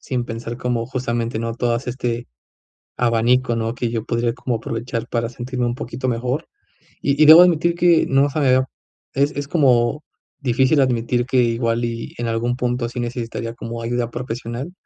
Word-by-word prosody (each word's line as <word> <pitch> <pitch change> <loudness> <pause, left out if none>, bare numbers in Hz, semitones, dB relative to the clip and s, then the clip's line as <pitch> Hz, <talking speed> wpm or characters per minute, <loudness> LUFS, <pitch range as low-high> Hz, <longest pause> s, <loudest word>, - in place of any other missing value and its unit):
sin 125 -2 -2
pensar 115 +1 -6
como, 120 -2 -1
justamente, 120 -2 -2
¿no?, 115 0 -3
todas 120 +1 -1
este 120 -1 -3 0.7
abanico, 120 +1 +2
¿no?, 115 +1 -2
que 120 -1 -2
yo 115 -2 -2
podría 115 0 -1
como 125 -1 -3
aprovechar 115 +1 -4
para 115 -1 -1
sentirme 125 +1 -3
un 120 - -2
poquito 130 +1 -5
mejor. 125 +5 -2 0.5
Y 140 +1 +1
y, - - +8
debo 160 +3 +11
admitir 170 -1 +4
que 175 -1 +4
no 135 +2 +3
se 150 - -2
me 140 - +2
había 130 +1 +4 0.5
es 140 +2 +2
es 145 -2 -5
como 135 -2 +2 0.4
difícil 130 +2 +2
admitir 120 -1 +1
que 130 0 0
igual 115 0 0
y 115 -1 -5
en 120 - -2
algún 115 +2 -1
punto, 125 -1 -1
sí 120 - -6
necesitaría 115 -1 -4
como 115 0 -6
ayuda 120 0 -2
profesional, 120 +4 -5
120 Hz, 180 wpm, -21 LUFS, 115-130 Hz, 0.7 s, debo